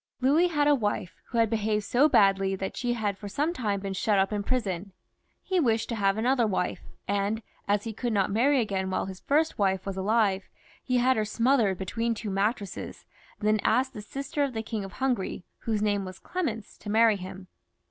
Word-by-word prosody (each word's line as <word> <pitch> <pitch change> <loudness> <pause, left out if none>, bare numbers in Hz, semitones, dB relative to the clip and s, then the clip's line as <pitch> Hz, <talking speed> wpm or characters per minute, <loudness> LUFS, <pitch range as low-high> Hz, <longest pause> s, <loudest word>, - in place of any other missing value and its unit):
Louis 290 +7 +4
had 295 -4 +1
a 295 - +6
wife 210 -8 -1
who 235 - -5
had 230 -1 +4
behaved 215 -1 0
so 260 +8 +3
badly, 195 -4 +4
that 190 0 -4
she 245 -1 -1
had 205 -4 -2
for 205 - -7
some 295 - 0
time 205 - -1
been 195 -1 -3
shut 205 +2 +1
up 195 +2 +2
in 205 - 0
prison. 200 -5 -2 0.5
He 375 -1 +1
wished 230 -7 +1
to 235 - -1
have 195 -1 +1
another 240 +1 +2
wife, 185 -3 -1 0.3
and 205 +3 0 0.2
as 205 0 +2
he 225 - -4
could 240 +3 -2
not 200 -2 +1
marry 260 +7 +3
again 195 -4 -1
while 190 - -1
his 190 -1 -7
first 310 0 +1
wife 190 -2 +1
was 195 -1 -4
alive, 200 -1 +1 0.3
he 250 -1 +1
had 255 +1 +3
her 215 - +2
smothered 230 -3 +2
between 230 +5 -1
two 210 -1 -5
mattresses, 200 0 -2 0.3
and 210 - -1
then 215 0 +3
asked 260 +4 +2
the 210 - -7
sister 275 +6 -3
of 275 -2 -1
the 220 -1 -3
King 220 -2 -4
of 195 0 -8
Hungary, 250 -9 -1 0.2
whose 215 -2 -1
name 205 -2 +1
was 185 0 -8
Clemence, 230 - -4
to 210 - -8
marry 220 0 +5
him. 185 0 -9
215 Hz, 210 wpm, -27 LUFS, 195-245 Hz, 0.5 s, a